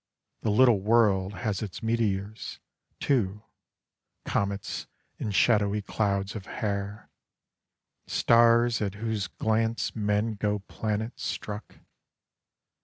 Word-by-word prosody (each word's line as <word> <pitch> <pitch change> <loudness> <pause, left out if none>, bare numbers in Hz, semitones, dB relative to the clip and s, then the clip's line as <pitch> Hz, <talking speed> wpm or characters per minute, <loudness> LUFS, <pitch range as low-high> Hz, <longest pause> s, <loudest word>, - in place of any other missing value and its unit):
The - - 0
Little 115 0 +5
World 105 -3 +3
has 105 -2 -2
its 105 0 -6
meteors, 110 -2 -1 0.4
too, 105 -6 0 0.8
comets 100 0 -2 0.3
and 105 - -2
shadowy 105 -2 +3
clouds 100 -1 -1
of 100 -4 -7
hair, 100 0 -4 1.0
stars 115 0 +4
at 100 -2 -1
whose 110 -1 -2
glance 115 +1 0
men 105 +1 +1
go 105 0 0
planet 110 +3 -4
struck. 105 +1 -5
105 Hz, 100 wpm, -28 LUFS, 100-115 Hz, 1.0 s, Little